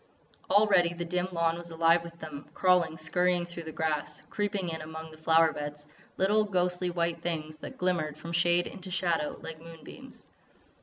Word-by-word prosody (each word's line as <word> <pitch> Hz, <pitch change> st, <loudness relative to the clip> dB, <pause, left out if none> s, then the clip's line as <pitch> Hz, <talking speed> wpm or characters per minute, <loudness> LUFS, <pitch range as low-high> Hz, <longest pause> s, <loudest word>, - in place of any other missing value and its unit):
Already 195 Hz, -4 st, +4 dB
the 175 Hz, 0 st, -4 dB
dim 180 Hz, +1 st, -1 dB
lawn 170 Hz, -1 st, +1 dB
was 175 Hz, 0 st, -9 dB
alive 165 Hz, +1 st, +4 dB
with 170 Hz, 0 st, -10 dB
them, 150 Hz, -2 st, -8 dB
crawling, 180 Hz, -4 st, +3 dB
scurrying 175 Hz, +2 st, +1 dB
through 175 Hz, 0 st, -8 dB
the 160 Hz, -, -5 dB
grass, 155 Hz, -2 st, -2 dB
creeping 205 Hz, -3 st, -1 dB
in 160 Hz, -1 st, -4 dB
among 160 Hz, +1 st, -8 dB
the 155 Hz, -, -13 dB
flower 160 Hz, 0 st, +4 dB
beds, 150 Hz, 0 st, -6 dB, 0.3 s
little, 210 Hz, +3 st, +3 dB
ghostly 180 Hz, -2 st, 0 dB
white 170 Hz, -1 st, -1 dB
things 155 Hz, -2 st, -2 dB
that -, -, -9 dB
glimmered 170 Hz, -5 st, 0 dB
from 165 Hz, +2 st, -7 dB
shade 175 Hz, +1 st, +4 dB
into 190 Hz, -1 st, -8 dB
shadow 175 Hz, -4 st, 0 dB
like 160 Hz, -1 st, -7 dB
moonbeams. 165 Hz, -1 st, -12 dB
170 Hz, 170 wpm, -29 LUFS, 160-180 Hz, 0.3 s, Already